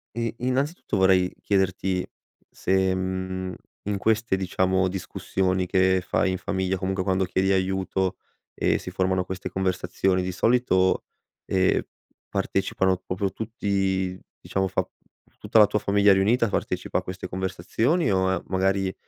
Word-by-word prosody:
E 115 -1 -2
innanzitutto, 130 - -1
vorrei 95 -1 +4
chiederti 95 -1 0 0.4
se, 95 0 +1
mhmm, 95 0 -3 0.3
in 100 0 -1
queste, 110 -1 +1
diciamo, 95 0 +1
discussioni 95 0 -1
che 95 0 +2
fai 95 - +1
in - - -1
famiglia, 95 0 -1
comunque 95 0 -1
quando 95 0 +1
chiedi 95 +1 0
aiuto 95 0 0 0.4
e - - +1
si - - -7
formano 95 0 0
queste 95 0 -5
conversazioni, 95 0 0
di 90 - -2
solito, 95 -3 +2 0.4
ehm, 95 -1 +2 0.5
partecipano 95 -1 0
proprio 95 +1 -3
tutti, 95 -4 -1 0.2
diciamo, 95 0 -1
fa - - -1 0.5
tutta 110 - +2
la 105 - +9
tua 105 - 0
famiglia 100 0 +4
riunita 110 +5 +3
partecipa - - -1
a - - -3
queste 90 0 -6
conversazioni? 100 - 0
O 95 -1 +1
magari 95 0 +1
95 Hz, 130 wpm, -25 LUFS, 95-100 Hz, 0.5 s, la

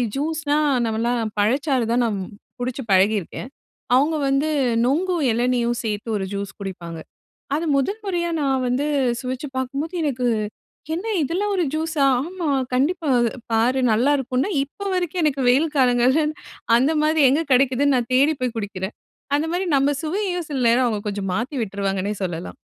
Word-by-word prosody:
ஜூஸ்னா, 300 0 0 0.3
நம்மலாம் 225 0 -1
பழச்சாறு 260 +3 +1
தான் 240 +1 +3
நான் 210 -3 -1 0.4
குடிச்சு 255 +1 -3
பழகியிருக்கேன். 200 +4 +1 0.5
அவுங்க 300 +5 +3
வந்து 275 +3 +1 0.4
நொங்கும், 335 +4 +1
இளநீயும் 240 0 +1
சேர்த்து 215 +1 -3
ஒரு 190 - -2
ஜூஸ் 200 0 -4
குடிப்பாங்க. 175 -4 -6 0.6
அது 330 +2 -1
முதல் 395 +11 -1
முறையா 345 -3 -1
நான் 270 -2 +1
வந்து 255 +4 0 0.3
சுவைச்சு 255 +3 -4
பார்க்கும்போது 275 +6 -3
எனக்கு, 255 -4 -1 0.7
"என்ன 370 +6 -5 0.2
இதெல்லாம் 400 +8 -1
ஒரு 355 -3 +1
ஜூஸா?", 315 -3 0 0.2
"ஆமா, 345 -3 -3 0.2
கண்டிப்பா." 295 +4 +1
"இது 235 - +1 0.2
பாரு 245 +4 +2
நல்லாருக்குன்ன." 265 - +1
இப்ப 395 +8 -6
வரைக்கும், 355 -1 -1
எனக்கு 275 -3 0
வெயில் 300 +5 +3
காலங்கள்ல, 255 +4 +3 0.5
அந்த 270 +5 +2
மாரி 310 0 +3
எங்க 315 +4 +2
கெடைக்குதுன்னு, 270 +2 +3
நான் 245 0 -3
தேடி 290 +4 +4
போய் 250 -2 -1
குடிக்கிறேன். 200 -2 -4 0.4
அந்த 310 - -1
மாரி 360 +1 -1
நம்ம 280 +1 +2
சுவையயும், 355 0 -2
சில 270 - -1
நேரம் 245 +2 +4
அவுங்க 210 -3 -2
கொஞ்சம் 195 -2 -3
மாத்தி 250 +7 -3
விட்டுருவாங்கன்னே 200 0 -2
சொல்லலாம். 175 -1 -5
265 Hz, 150 wpm, -22 LUFS, 230-310 Hz, 0.7 s, தேடி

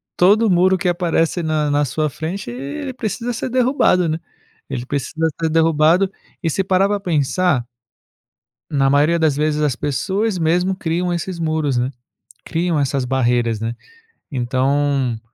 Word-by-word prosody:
todo 210 +5 +4
muro 185 +1 +4
que 185 0 -2
aparece 175 -1 +1
na 155 -2 0
na 145 +1 +2
sua 155 +4 -1
frente, 160 +2 -5
ele 140 - -5
precisa 240 0 -3
ser 230 - -3
derrubado, 250 -8 +2
né. 160 0 -1 0.5
Ele 130 -3 -4
precisa 145 +4 -1
ser 165 - +1
derrubado 165 +3 +3 0.3
e 165 - 0
se 190 +5 0
parar 190 +1 +2
para 205 0 -1
pensar 165 -5 +1 1.1
na 135 -2 +2
maioria 150 +4 +3
das 160 -4 +2
vezes, 150 0 0
as 145 -4 +1
pessoas 190 - -1
mesmo 175 +3 +1
criam 175 0 -1
esses 175 +1 -4
muros, 155 -5 0
né. 125 +1 0 0.6
Criam 170 -1 -1
essas 140 -2 0
barreiras, 120 -3 +1
né. 115 +1 -3 0.6
Então, 135 -1 0
160 Hz, 150 wpm, -19 LUFS, 140-180 Hz, 1.1 s, todo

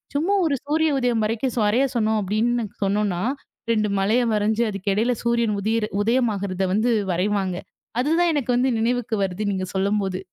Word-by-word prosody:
சும்மா 330 +8 +1
ஒரு 295 -3 +1
சூரிய 310 +2 +1
உதயம் 240 -3 +1
வரைக்கும் 225 +3 -1
ஸ் - - 0
வரைய 225 +6 +3
சொன்னோம் 220 -1 +1
அப்படின்னு 230 +5 0 0.2
சொன்னோம்ன்னா, 200 -3 0 0.5
2 215 -1 +1
மலையை 225 +6 +2
வரைஞ்சு 215 +2 +1
அதுக்கிடையில 205 +5 0
சூரியன் 235 -3 +1
உதிர் 220 +1 0 0.2
உதயம் 240 +1 +2
ஆகுறத 195 -1 -3
வந்து 225 +4 +2 0.2
வரைவாங்க. 190 +1 0 0.4
அதுதான் 330 +6 +2
எனக்கு 265 -3 -2
வந்து 255 +2 +2
நினைவுக்கு 235 0 0
வருது 190 +2 -2
நீங்க 185 -1 -2
சொல்லும்போது. 195 -1 0
220 Hz, 155 wpm, -23 LUFS, 200-245 Hz, 0.5 s, வரைய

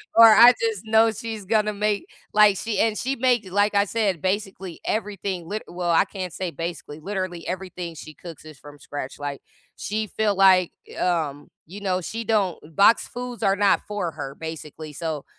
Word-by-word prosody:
or 230 0 +10
I 235 +3 +9
just 225 -3 -1
know 220 +1 +4
she's 220 -1 -6
gonna 215 +1 +1
make, 205 0 -1 0.2
like, 210 -2 +5
she, 220 -1 -2
and 225 -1 +2
she 265 +5 -2
makes, 240 -5 +1
like 205 +2 +2
I 200 0 +3
said, 200 -6 -1
basically 190 -2 -3
everything 200 -5 -3
lit 215 +4 -4
well, 175 0 -4
I 170 +3 +4
can't 185 -4 -6
say 185 -2 -4
basically, 165 -1 -6
literally 185 -1 -4
everything 180 -2 -5
she 155 0 -10
cooks 165 0 -11
is 155 -4 -12
from 145 0 -13
scratch, 140 -1 -7
like, 145 -1 -5 0.4
she 215 +1 -2
feel, 210 0 0
like, 185 -2 +5 0.3
um, 155 -5 -1 0.2
you 195 +6 -10
know, 185 -2 0
she 225 +6 -4
don't 205 -6 +1 0.2
boxed 205 +3 +5
foods 245 -1 -6
are 195 0 +3
not 200 0 +3
for 205 -5 -3
her, 140 -3 -7
basically, 155 -1 -8
so, 155 -2 -4
195 Hz, 185 wpm, -24 LUFS, 170-215 Hz, 0.4 s, or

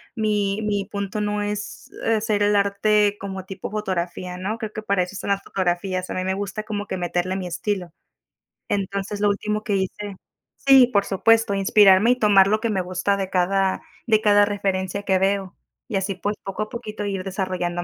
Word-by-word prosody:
mi 210 -2 0
mi 205 -2 -1
punto 200 0 -4
no 210 0 -1
es 205 0 -5 0.2
hacer 215 -2 +1
el 205 0 +3
arte 205 +1 +2
como 190 -1 -6
tipo 190 0 -7
fotografía, 180 -3 -3
¿no? 200 +5 -3
Creo 220 -2 -6
que 215 - -5
para 200 -3 +1
eso 180 +2 -8
son 200 - -5
las 195 - +1
fotografías, 185 0 -2
a - - -3
mí 185 - -2
me 190 - 0
gusta 200 +1 -4
como 205 -1 -4
que 190 - -4
meterle 180 +1 -1
mi 185 - -4
estilo. 180 +1 -3 0.8
Entonces, 200 +1 -2
lo 210 - +4
último 210 +1 -1
que 205 - 0
hice 195 +1 -3 0.4
sí, 270 -3 +6
por 200 -5 +2
supuesto, 225 +2 +3
inspirarme 195 +2 +5
y - - +4
tomar 200 -3 +6
lo 215 +2 +1
que 230 - 0
me 195 -4 0
gusta 185 +2 -1
de 195 -1 -3
cada 190 +1 +1 0.3
de 215 -2 +4
cada 205 -1 +5
referencia 200 -1 -2
que 190 -2 +2
veo, 195 -1 0 0.3
y 215 - -1
así, 195 0 -2
pues, 205 +3 -2
poco 195 +2 -3
a 215 - -9
poquito 215 -3 -6
ir 195 -2 -3
desarrollando 185 -2 -2
200 Hz, 195 wpm, -23 LUFS, 190-210 Hz, 0.8 s, sí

